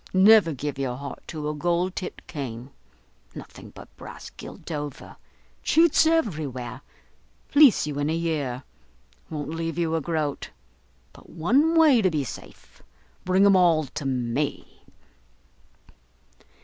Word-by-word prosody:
Never 195 Hz, -2 st, +6 dB
give 145 Hz, 0 st, -5 dB
your 130 Hz, -3 st, -2 dB
heart 140 Hz, +2 st, -8 dB
to 155 Hz, -3 st, -5 dB
a 150 Hz, -, -2 dB
gold 175 Hz, +4 st, -1 dB
topped 185 Hz, -, -6 dB
cane, 130 Hz, -4 st, -7 dB, 0.6 s
nothing -, -, -11 dB
but -, -, -14 dB
brass -, -, -10 dB
gilt -, -, -10 dB
over. 145 Hz, -2 st, -6 dB, 0.5 s
Cheats 325 Hz, -1 st, +4 dB
everywhere: 155 Hz, -, -1 dB, 0.7 s
fleece 285 Hz, -, +6 dB
you 145 Hz, -1 st, -4 dB
in 145 Hz, +1 st, 0 dB
a 160 Hz, -, 0 dB
year; 145 Hz, -7 st, -2 dB, 0.7 s
won't 150 Hz, -2 st, -5 dB
leave 165 Hz, 0 st, -4 dB
you 165 Hz, -2 st, 0 dB
a 165 Hz, -, 0 dB
groat. 155 Hz, -2 st, -3 dB, 0.6 s
But -, -, -17 dB
one 270 Hz, -, +2 dB
way 300 Hz, -7 st, +6 dB
to 190 Hz, -, +3 dB
be 155 Hz, -4 st, -1 dB
safe, 130 Hz, -, -11 dB, 0.4 s
bring 185 Hz, +2 st, +4 dB
'em 200 Hz, -1 st, +6 dB
all 170 Hz, -4 st, +4 dB
to 140 Hz, +2 st, -7 dB
me." 130 Hz, +2 st, -3 dB
160 Hz, 135 wpm, -25 LUFS, 145-185 Hz, 0.7 s, Never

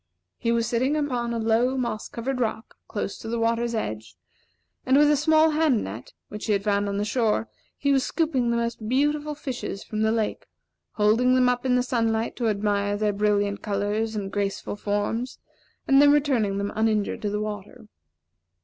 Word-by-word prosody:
He 230 Hz, -, 0 dB
was 230 Hz, -1 st, +1 dB
sitting 255 Hz, +6 st, +1 dB
upon 250 Hz, -6 st, -1 dB
a 235 Hz, -, -1 dB
low, 230 Hz, +4 st, +1 dB
moss 235 Hz, -4 st, -3 dB
covered 255 Hz, +3 st, -3 dB
rock, 220 Hz, -1 st, -2 dB
close 205 Hz, -1 st, -4 dB
to -, -, -8 dB
the 235 Hz, +1 st, -2 dB
water's 230 Hz, +1 st, 0 dB
edge; 110 Hz, -, -4 dB, 0.7 s
and 260 Hz, +2 st, +3 dB
with 295 Hz, 0 st, +5 dB
a -, -, +4 dB
small 315 Hz, +2 st, +4 dB
hand 300 Hz, -7 st, +2 dB
net, 110 Hz, +5 st, -8 dB
which 210 Hz, +2 st, -7 dB
he 215 Hz, -, +2 dB
had 200 Hz, -1 st, 0 dB
found 205 Hz, -1 st, +1 dB
on 200 Hz, -, -2 dB
the 205 Hz, -, 0 dB
shore, 225 Hz, -1 st, 0 dB, 0.3 s
he 280 Hz, -, +1 dB
was 270 Hz, -2 st, +3 dB
scooping 285 Hz, -8 st, 0 dB
the 235 Hz, -, +1 dB
most 235 Hz, -2 st, -3 dB
beautiful 295 Hz, +3 st, +1 dB
fishes 255 Hz, -8 st, -5 dB
from 215 Hz, 0 st, -4 dB
the 220 Hz, 0 st, +3 dB
lake, 220 Hz, -2 st, -2 dB, 0.5 s
holding 230 Hz, +4 st, +3 dB
them 255 Hz, -1 st, +4 dB
up 250 Hz, +1 st, 0 dB
in 250 Hz, -, +3 dB
the 250 Hz, -, +2 dB
sunlight 230 Hz, -3 st, 0 dB
to 235 Hz, -, 0 dB
admire 205 Hz, -1 st, 0 dB
their 210 Hz, 0 st, 0 dB
brilliant 205 Hz, 0 st, 0 dB
colors 210 Hz, +2 st, -1 dB
and 195 Hz, -2 st, -4 dB
graceful 200 Hz, 0 st, -2 dB
forms, 205 Hz, +4 st, -2 dB, 0.5 s
and 275 Hz, +1 st, +6 dB
then 290 Hz, 0 st, +7 dB
returning 260 Hz, -9 st, +2 dB
them 200 Hz, 0 st, -3 dB
uninjured 215 Hz, -1 st, 0 dB
to 210 Hz, -, -1 dB
the 210 Hz, +1 st, -2 dB
water. 210 Hz, +2 st, -6 dB
225 Hz, 190 wpm, -25 LUFS, 210-255 Hz, 0.7 s, then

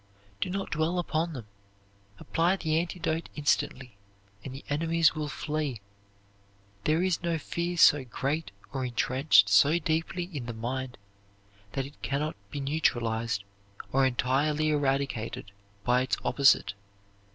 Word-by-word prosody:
Do -, -, -1 dB
not 195 Hz, +1 st, -3 dB
dwell 160 Hz, +3 st, 0 dB
upon 170 Hz, -1 st, -1 dB
them. 125 Hz, -6 st, -7 dB, 0.7 s
Apply 170 Hz, -, +1 dB
the 160 Hz, -4 st, 0 dB
antidote 165 Hz, -1 st, -2 dB
instantly, 135 Hz, -5 st, -1 dB, 0.5 s
and 135 Hz, -, -6 dB
the 135 Hz, +2 st, -9 dB
enemies 165 Hz, +2 st, +2 dB
will 155 Hz, -2 st, -3 dB
flee. 150 Hz, -4 st, -3 dB, 1.1 s
There 160 Hz, +3 st, +2 dB
is 185 Hz, -3 st, +1 dB
no 170 Hz, -2 st, 0 dB
fear 170 Hz, +2 st, -3 dB
so 145 Hz, -3 st, +6 dB
great 140 Hz, +6 st, -2 dB, 0.2 s
or 135 Hz, -2 st, -2 dB
intrenched 125 Hz, -2 st, +4 dB
so 140 Hz, +12 st, +5 dB
deeply 165 Hz, +2 st, -1 dB
in 125 Hz, -4 st, -4 dB
the 115 Hz, -, -5 dB
mind 125 Hz, +2 st, -4 dB, 0.8 s
that 135 Hz, -, -1 dB
it 140 Hz, +2 st, -13 dB
can 140 Hz, 0 st, -1 dB
not 155 Hz, +1 st, -2 dB
be 145 Hz, -, -5 dB
neutralized 115 Hz, -7 st, 0 dB, 0.5 s
or 135 Hz, +1 st, +3 dB
entirely 140 Hz, +4 st, +1 dB
eradicated 135 Hz, -6 st, -1 dB, 0.3 s
by 125 Hz, +1 st, +3 dB
its 120 Hz, -6 st, 0 dB
opposite. 135 Hz, -7 st, +4 dB
145 Hz, 135 wpm, -28 LUFS, 130-160 Hz, 1.1 s, so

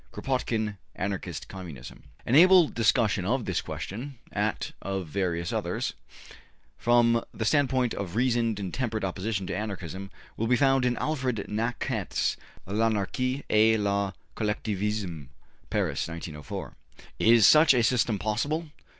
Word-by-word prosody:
Kropotkin, 110 Hz, -5 st, -2 dB, 0.2 s
``Anarchist 95 Hz, 0 st, -4 dB
Communism.'' 85 Hz, -10 st, -9 dB, 0.2 s
An 120 Hz, -, -1 dB
able 180 Hz, +2 st, +8 dB
discussion 110 Hz, -3 st, +2 dB
of 120 Hz, +5 st, 0 dB
this 95 Hz, -, -1 dB
question, 125 Hz, +7 st, -6 dB
at -, -, -1 dB
of 95 Hz, -1 st, -3 dB
various 85 Hz, 0 st, -2 dB
others, -, -, -2 dB, 0.8 s
from 120 Hz, -1 st, +3 dB
the 110 Hz, -, -4 dB
standpoint 130 Hz, 0 st, +2 dB
of 95 Hz, -2 st, -5 dB
reasoned 115 Hz, -3 st, +1 dB
and 95 Hz, -3 st, -4 dB
temperate 115 Hz, -4 st, -2 dB
opposition 95 Hz, +1 st, -2 dB
to 90 Hz, -, -3 dB
Anarchism, 95 Hz, -2 st, -5 dB, 0.3 s
will 115 Hz, -, 0 dB
be 125 Hz, -, +4 dB
found 135 Hz, 0 st, +3 dB
in 120 Hz, -1 st, +1 dB
Alfred 130 Hz, -8 st, -1 dB
Naquet's 115 Hz, +3 st, -1 dB, 0.3 s
``L'Anarchie 115 Hz, +6 st, 0 dB
et 110 Hz, +1 st, +4 dB
le 100 Hz, -1 st, 0 dB, 0.2 s
Collectivisme,'' 105 Hz, -, -2 dB, 0.4 s
Paris, -, -, -1 dB
1904. 80 Hz, -3 st, -7 dB, 0.5 s
Is 115 Hz, -2 st, +6 dB
such 155 Hz, -2 st, +7 dB
a 120 Hz, -, +3 dB
system 115 Hz, -2 st, +2 dB
possible? 145 Hz, -, -1 dB
110 Hz, 125 wpm, -27 LUFS, 95-125 Hz, 0.8 s, able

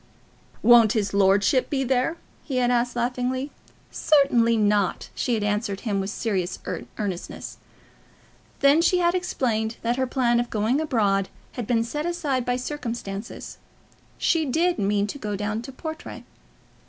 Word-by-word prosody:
"Won't 235 Hz, -3 st, +7 dB
his 205 Hz, -3 st, -1 dB
lordship 200 Hz, +5 st, +3 dB
be 270 Hz, -2 st, 0 dB
there?" 260 Hz, +6 st, 0 dB, 0.3 s
he 265 Hz, -4 st, -3 dB
had 245 Hz, -1 st, +2 dB, 0.2 s
said 245 Hz, -, -14 dB
laughingly. 255 Hz, +3 st, -1 dB, 0.4 s
"Certainly 250 Hz, -6 st, +3 dB
not," 205 Hz, -3 st, +1 dB
she 245 Hz, -, 0 dB
had 215 Hz, -, -2 dB
answered 205 Hz, -1 st, -1 dB
with 195 Hz, -3 st, -1 dB
serious 190 Hz, -4 st, -2 dB, 0.4 s
earnestness. 195 Hz, -4 st, -5 dB, 1.0 s
Then 280 Hz, +3 st, +5 dB
she 355 Hz, +2 st, +3 dB
had 345 Hz, -1 st, +2 dB
explained 235 Hz, -11 st, -1 dB
that 235 Hz, +2 st, 0 dB
her 260 Hz, 0 st, 0 dB
plan 240 Hz, -2 st, +2 dB
of 240 Hz, -, -2 dB
going 225 Hz, +7 st, +1 dB
abroad 205 Hz, -10 st, +1 dB, 0.2 s
had 240 Hz, -4 st, -5 dB
been 230 Hz, -2 st, +2 dB
set 295 Hz, +7 st, -3 dB
aside 295 Hz, -8 st, -1 dB
by 245 Hz, -, +2 dB
circumstances. 235 Hz, -6 st, -5 dB, 0.6 s
She 330 Hz, -2 st, +2 dB
did 335 Hz, +6 st, +1 dB
mean 200 Hz, 0 st, +1 dB
to 210 Hz, +7 st, -6 dB
go 210 Hz, -3 st, -3 dB
down 210 Hz, +2 st, -2 dB
to 265 Hz, +3 st, -9 dB
Portray. 315 Hz, +4 st, -7 dB
240 Hz, 145 wpm, -24 LUFS, 210-270 Hz, 1.0 s, Won't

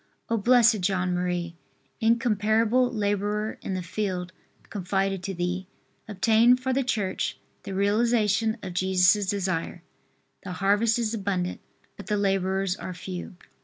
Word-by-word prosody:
O, 230 Hz, -, +1 dB
Bl. 245 Hz, +4 st, +4 dB, 0.2 s
John 185 Hz, -1 st, 0 dB
Marie, 175 Hz, -1 st, -2 dB, 0.5 s
incomparable 230 Hz, +1 st, +2 dB
laborer 210 Hz, 0 st, -1 dB
in 190 Hz, -, -3 dB
the 185 Hz, -, -3 dB
field 185 Hz, -1 st, -3 dB, 0.4 s
confided 195 Hz, -1 st, -1 dB
to 195 Hz, +1 st, -4 dB
thee, 180 Hz, +2 st, -2 dB, 0.4 s
obtain 220 Hz, +4 st, +4 dB
for 260 Hz, +1 st, -2 dB
the 270 Hz, +1 st, +1 dB
Church 210 Hz, -6 st, -2 dB, 0.2 s
the 195 Hz, -, -6 dB
realization 220 Hz, +1 st, +2 dB
of 185 Hz, -2 st, -5 dB
Jesus' 190 Hz, +2 st, +3 dB
desire. 185 Hz, -3 st, -2 dB, 0.6 s
The 185 Hz, -, -6 dB
harvest 205 Hz, +5 st, +2 dB
is 230 Hz, -2 st, -1 dB
abundant, 195 Hz, -4 st, -2 dB, 0.4 s
but 200 Hz, -, -10 dB
the 210 Hz, -, 0 dB
laborers 195 Hz, -1 st, 0 dB
are 185 Hz, -3 st, -7 dB
few. 180 Hz, 0 st, -7 dB
200 Hz, 130 wpm, -26 LUFS, 185-220 Hz, 0.6 s, Bl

